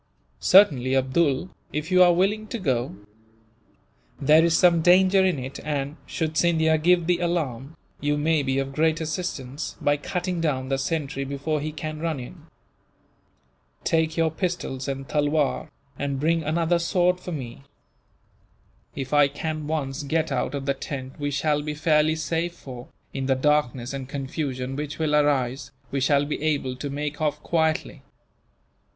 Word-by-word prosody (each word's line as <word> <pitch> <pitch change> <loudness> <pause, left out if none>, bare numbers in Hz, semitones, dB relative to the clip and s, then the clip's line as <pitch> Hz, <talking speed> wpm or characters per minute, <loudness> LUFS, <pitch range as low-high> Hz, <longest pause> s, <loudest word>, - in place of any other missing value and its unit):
"Certainly, 135 - +5
Abdool, 135 +4 +1 0.2
if 150 +3 -4
you 185 0 +5
are 180 -1 +8
willing 200 +5 +1
to 235 - -4
go. 130 - -1 1.2
There 155 +3 +5
is 170 -1 +3
some 170 -2 +5
danger 185 +3 +5
in 185 -4 +2
it 130 +1 -6
and, 145 -1 -2
should 160 -1 -2
Scindia 160 -2 +3
give 175 +1 +3
the 175 0 +2
alarm, 160 -5 -2 0.2
you 145 0 0
may 155 +1 +2
be 135 -1 -1
of 135 0 -2
great 160 +2 +2
assistance, 150 -4 -4
by 145 0 +2
cutting 180 +3 -3
down 130 -5 -1
the 135 -1 0
sentry 140 -1 -2
before 140 +2 -2
he 155 +1 -3
can 155 0 -5
run 160 -3 -2
in. 125 - -10 1.4
Take 160 0 +1
your 165 -1 +2
pistols 160 -6 -3
and 135 -1 -4
tulwar, 150 0 0 0.3
and 140 -1 -2
bring 165 +3 +2
another 165 +2 +1
sword 180 +1 +2
for 180 - -7
me. 130 -6 -6 1.3
If 135 0 -5
I 145 -1 +6
can 155 +1 -4
once 150 -2 -2
get 155 +2 -1
out 135 +2 -1
of 140 -1 -4
the 140 - +1
tent 135 0 -7
we 145 0 -1
shall 145 +1 +1
be 150 0 -4
fairly 155 0 +3
safe 165 +2 -2
for, 125 -5 -10 0.3
in 135 -1 -3
the 135 - +3
darkness 130 -3 +1
and 135 -1 -6
confusion 135 -2 -3
which 145 +1 -4
will 155 -2 +1
arise, 140 -3 +1 0.2
we 140 - -1
shall 140 +2 +3
be 145 - -4
able 145 -4 0
to 145 +2 -4
make 150 +2 -4
off 150 -1 -1
quietly. 160 -2 0
150 Hz, 160 wpm, -25 LUFS, 135-165 Hz, 1.4 s, are